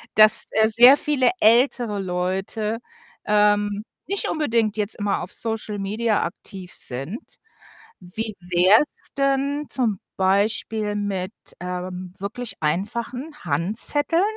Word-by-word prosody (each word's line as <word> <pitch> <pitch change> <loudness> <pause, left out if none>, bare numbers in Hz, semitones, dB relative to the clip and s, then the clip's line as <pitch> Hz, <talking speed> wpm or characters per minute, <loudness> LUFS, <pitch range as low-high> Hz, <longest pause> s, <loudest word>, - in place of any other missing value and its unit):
dass, 215 +1 +7
äh, 220 0 +3
sehr 245 +5 +7
viele 285 -5 +2
ältere 230 -2 +3
Leute, 190 +4 -2 0.5
ähm, 205 0 +2 0.2
nicht 400 +1 -2
unbedingt 230 -9 0
jetzt 210 0 +1
immer 205 -1 -1
auf - - -7
Social 220 -2 -4
Media 215 +3 0
aktiv 185 -3 -8
sind. 135 - -4 0.8
Wie 215 +4 -6
wär's 180 - +3
denn 275 +1 0
zum 225 -7 -1 0.2
Beispiel 210 +2 0
mit, 200 -1 -3 0.3
ähm, 180 0 -5
mit 185 - -27
wirklich 225 +4 -5
einfachen 235 - -2
Handzetteln? 220 - 0
210 Hz, 115 wpm, -23 LUFS, 190-235 Hz, 0.8 s, dass